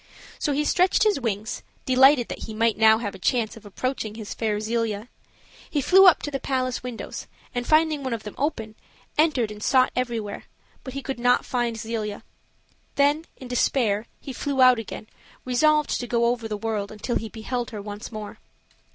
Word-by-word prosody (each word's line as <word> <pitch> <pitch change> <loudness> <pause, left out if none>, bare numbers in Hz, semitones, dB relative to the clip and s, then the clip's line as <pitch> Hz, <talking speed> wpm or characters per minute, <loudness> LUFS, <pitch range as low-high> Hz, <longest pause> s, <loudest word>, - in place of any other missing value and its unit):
So 295 - 0
he 295 +2 0
stretched 365 +4 +3
his 425 -7 +3
wings, 220 -3 -3 0.2
delighted 260 -1 +5
that - - -6
he 220 - -7
might 230 0 +2
now 220 0 +6
have 215 -3 -4
a 195 - -11
chance 225 +2 0
of 220 -2 -12
approaching 220 0 -3
his 220 -2 -6
fair 215 -2 -1
Zelia. 220 0 -2 0.6
He 295 - 0
flew 380 +7 +7
up 355 - +6
to 290 - -3
the 275 - -2
palace 255 -2 -1
windows, 250 -2 -6 0.3
and, 245 -1 -3
finding 310 -1 +3
one 260 -1 -3
of 230 -2 -3
them 210 - -7
open, 230 -7 -2 0.4
entered 285 -8 +2
and 210 0 -9
sought 255 +2 +3
everywhere, 235 -5 -3 0.4
but 260 0 -8
he 275 - -4
could 270 -3 -4
not 245 +1 +3
find 240 -2 -1
Zelia. 220 -2 -4 0.7
Then, 290 +3 +2
in 255 - -9
despair, 235 -3 +1
he 270 - -7
flew 275 +2 -3
out 255 -2 +7
again, 220 0 -7 0.4
resolved 300 +4 +2
to 245 - -4
go 235 -1 +1
over 235 -1 0
the 210 -1 -3
world 210 -2 -3
until 215 +3 -2
he 225 - -5
beheld 240 +2 -4
her 215 - -7
once 205 +2 -7
more. 215 -2 -7
240 Hz, 190 wpm, -25 LUFS, 220-270 Hz, 0.7 s, flew